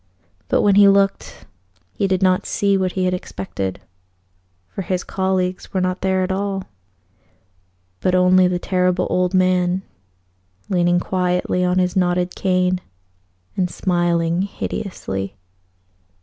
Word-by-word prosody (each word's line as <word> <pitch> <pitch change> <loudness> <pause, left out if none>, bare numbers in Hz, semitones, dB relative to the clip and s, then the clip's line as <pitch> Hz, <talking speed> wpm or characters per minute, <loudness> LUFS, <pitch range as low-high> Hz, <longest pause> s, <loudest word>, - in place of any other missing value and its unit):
But - - +2
when 205 - +4
he 200 0 +7
looked, 195 0 +1 0.5
he 200 - 0
did 190 0 0
not 185 +1 +2
see 200 -1 +1
what 185 -1 0
he 185 -1 0
had 180 - +1
expected; 95 - -5 0.9
for 140 - -6
his 180 -1 -2
colleagues 190 0 -2
were - - +2
not 185 0 -1
there 190 0 +1
at 185 - -2
all, 195 0 -2 1.4
but 185 - +1
only 185 0 +5
the 180 0 0
Terrible 180 0 0
Old 180 +1 +1
Man 185 0 +2 0.9
leaning 175 -1 +2
quietly 180 0 0
on 180 0 +1
his 180 -1 +1
knotted 180 -1 +1
cane 185 -1 +1 0.7
and 180 -2 0
smiling 175 -1 0
hideously. 100 - -4
185 Hz, 130 wpm, -20 LUFS, 180-190 Hz, 1.4 s, he